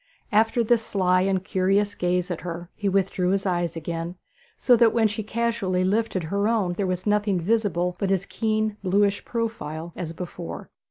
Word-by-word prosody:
After 225 +2 +3
this 230 0 +2
sly 185 -3 +2
and 190 -1 +1
curious 200 +1 +1
gaze 180 -1 0
at 175 - -4
her 175 0 -6
he 205 -2 -1
withdrew 190 -1 +1
his 195 +1 0
eye 175 -2 +1
again, 165 +2 -4 0.4
so 245 - +5
that 230 -1 +4
when 225 -2 +4
she 215 +1 -4
casually 215 -4 -1
lifted 200 -1 0
her 200 +6 0
own 210 -6 +1
there 190 +2 -1
was 185 0 -2
nothing 205 -2 +2
visible 180 -3 0
but 195 - 0
his 195 0 +1
keen 215 -1 -1
bluish 200 +1 +2
profile 170 -9 -4
as 165 -3 -4
before. 165 - -7
195 Hz, 175 wpm, -25 LUFS, 180-215 Hz, 0.4 s, so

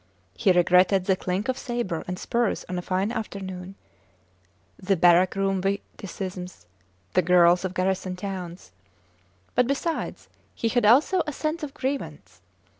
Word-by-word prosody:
He 140 - +2
regretted 180 +1 +4
the 190 -1 +3
clink 185 +3 -3
of 260 0 -1
sabre 235 -9 -3
and 180 0 -4
spurs 235 +2 -1
on 180 - -4
a 180 - -2
fine 190 +4 -1
afternoon, 195 -5 -6 1.1
the 195 0 +1
barrack 175 +2 +5
room 195 -1 0
witticisms, 190 - -5 0.5
the 185 - +4
girls 175 0 +4
of 185 0 -4
garrison 185 0 -1
towns; 180 - -7 0.8
but, 250 - +3
besides, 315 +4 -3 0.3
he 230 - -1
had 240 -2 +2
also 300 - +5
a - - -1
sense 310 +3 -3
of 295 -2 -6
grievance. 160 - -5
190 Hz, 140 wpm, -25 LUFS, 180-230 Hz, 1.1 s, barrack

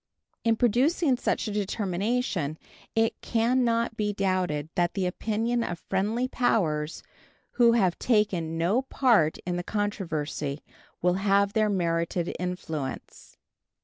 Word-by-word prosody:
In 230 -1 +3
producing 260 - +2
such 240 - -1
a - - -2
determination 200 - -1 0.4
it 225 0 +1
can 240 +3 +1
not 230 -1 +1
be 210 -1 -1
doubted 185 -7 -1
that 175 -1 0
the 190 -2 0
opinion 225 +5 -1
of 175 - -3
friendly 210 +8 -1
powers 165 - 0 0.5
who 235 -2 +4
have 190 -7 +2
taken 195 -8 +1
no 185 +10 +2
part 235 - +2
in 175 -1 -1
the 175 - -3
controversy 160 -9 -3 0.4
will 180 0 +4
have 200 0 +3
their 215 -1 +2
merited 170 -2 -1
influence. 160 -6 -5
200 Hz, 125 wpm, -27 LUFS, 175-230 Hz, 0.5 s, who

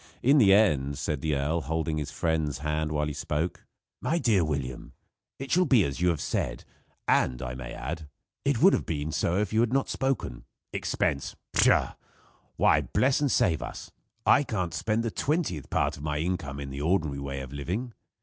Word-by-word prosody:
In 140 +4 +6
the 100 -6 +6
end, 75 -10 +3
said 75 -3 -2
the 75 0 0
earl, 75 +4 0
holding 80 0 -2
his 75 -1 -4
friend's 80 -4 -1
hand 75 +1 -2
while 75 0 0
he 75 - -3
spoke: 75 +3 -3 0.3
"My 165 - +1
dear 115 - +3
William, 70 -5 -4 0.4
it 135 0 -7
shall 180 +2 +4
be 120 -7 +5
as 70 +1 -3
you 90 - +4
have 85 -3 0
said; 65 -2 -2 0.4
and, 65 -1 +2
I 60 -2 -4
may 65 0 -7
add, 80 +3 -5 0.4
it 140 -1 +1
would 195 - +8
have - - 0
been 75 -1 -2
so 85 +3 0
if 105 0 -1
you 110 - +3
had 120 0 +3
not 135 +1 +1
spoken. 135 - -2 0.3
Expense! 70 -1 -1 0.2
Pshaw! - - +4 0.6
Why - - +4
bless 130 +2 +1
and 145 - +2
save 80 - +2
us! - - -7 0.3
I - - +6
can't 95 - -2
spend 110 +1 0
the 115 - -2
twentieth 140 - -1
part - - 0
of - - -10
my 75 -1 -1
income 75 -4 -2
in 70 -1 -6
the 70 +1 -5
ordinary 80 -4 +1
way 70 -1 -4
of 65 0 -8
living. 95 - -3
80 Hz, 195 wpm, -28 LUFS, 70-110 Hz, 0.6 s, would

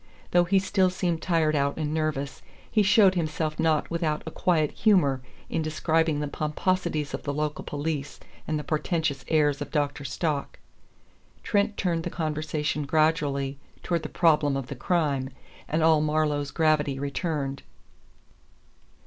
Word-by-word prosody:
Though 175 0 +4
he 195 +3 +3
still 190 -1 +2
seemed 175 -3 -1
tired 160 -3 +2
out 140 0 0
and 155 -1 -2
nervous, 155 -3 -2 0.3
he 215 - +4
showed 205 -1 +5
himself 155 -2 -2
not 160 -1 +1
without 165 -3 -1
a 160 - -5
quiet 155 -4 +1
humor 170 - +3 0.3
in - - -1
describing 160 0 +1
the 150 - -2
pomposities 155 +1 -1
of - - -3
the 145 - -3
local 150 +1 -2
police 145 -1 -4 0.3
and 155 - 0
the 150 - -4
portentous 155 -2 -1
airs 150 -3 +2
of 145 - -4
Dr. 145 -3 -1
Stock. 140 +2 -2 0.9
Trent 205 -1 +1
turned 170 -3 0
the 175 - -3
conversation 155 -2 -2
gradually 145 -3 +1 0.2
toward 170 -2 0
the - - -6
problem 150 -4 +3
of 135 -2 -5
the 140 - -5
crime, 140 -3 0 0.4
and 155 +1 0
all 160 -1 +5
Marlowe's 150 -2 0
gravity 150 -3 +1
returned. 140 -1 -2
155 Hz, 150 wpm, -26 LUFS, 145-165 Hz, 0.9 s, showed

